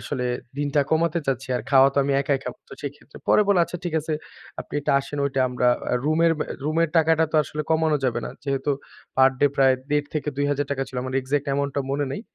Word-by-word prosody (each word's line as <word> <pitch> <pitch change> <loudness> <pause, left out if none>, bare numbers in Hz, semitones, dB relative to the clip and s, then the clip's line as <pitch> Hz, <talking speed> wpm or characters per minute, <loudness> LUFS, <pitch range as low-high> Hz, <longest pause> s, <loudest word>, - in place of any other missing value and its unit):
আসলে 130 -3 -3 0.3
দিনটা 145 0 +1
কমাতে 165 +1 +2
চাচ্ছি। 135 0 -2
আর 115 - -4
খাওয়া 135 0 +7
তো - - +2
আমি 140 - +1
একাই 140 0 +1
খাবো 125 - -6
তো - - -13
সেক্ষেত্রে।" 145 +1 -8
পরে 210 - +6
বলে 195 -3 +4
"আচ্ছা 175 - -6
ঠিক 170 -2 -3
আছে 155 +1 -4 0.5
আপনি - - -10
এটা 140 - 0
আসেন 145 +1 -7
ওইটা 135 -1 -1
আমরা 125 0 0 0.2
অ্যা 125 - +1
রুমের 165 +2 +3
অ্যা - - -1 0.2
রুমের 160 +2 +1
টাকাটা 160 0 +4
তো - - +2
আসলে 150 +2 -4
কমানো 160 -1 +3
যাবে 120 -2 0
না।" - - -6
যেহেতু 140 +1 -1 0.5
পার 130 0 +6
ডে 145 - +6
প্রায় 135 -1 +5 0.2
১.৫ 145 0 +1
থেকে 150 -1 -2
৳২০০০ 145 -1 0
ছিল 130 - -9
আমার 130 0 -5
এক্সাক্ট 140 +2 -1
অ্যামাউন্টটা 140 0 0
মনে 145 +1 0
নেই। 200 - -4
145 Hz, 220 wpm, -24 LUFS, 135-155 Hz, 0.5 s, খাওয়া